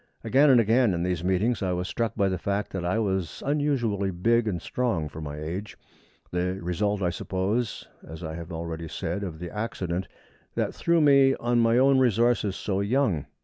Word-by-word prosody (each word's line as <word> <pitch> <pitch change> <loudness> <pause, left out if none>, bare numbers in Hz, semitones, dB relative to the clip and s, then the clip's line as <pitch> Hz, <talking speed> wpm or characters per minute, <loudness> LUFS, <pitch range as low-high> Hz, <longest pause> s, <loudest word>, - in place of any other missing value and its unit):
Again 140 +3 +4
and 130 -3 +7
again 115 -2 +3
in 85 - -2
these 90 -2 -1
meetings 95 +7 +1
I 95 -2 0
was 90 +1 -2
struck 115 0 -2
by 100 -3 +2
the 95 -1 -1
fact 100 +1 -2
that 95 -2 -4
I 90 +5 0
was 95 -6 -2
unusually 135 -9 0
big 115 +6 +1
and 90 -5 -1
strong 110 -6 -1
for 80 +2 -9
my 75 -1 -6
age, 90 +7 -5 0.5
the 90 +1 -1
result, 100 +3 -1
I 90 - +1
suppose, 95 +6 -2 0.2
as 80 +3 -9
I 80 -1 -4
have 85 +2 -7
already 80 0 -5
said, 100 +5 -4
of 85 -5 -5
the 85 +1 -7
accident 95 -5 -3 0.5
that - - -1
threw 170 -1 +2
me 140 -2 +5
on 120 0 0
my 115 0 +4
own 135 +1 +5
resources 120 -4 +2
so 95 -2 -2
young. 100 - +1
100 Hz, 190 wpm, -26 LUFS, 90-120 Hz, 0.5 s, and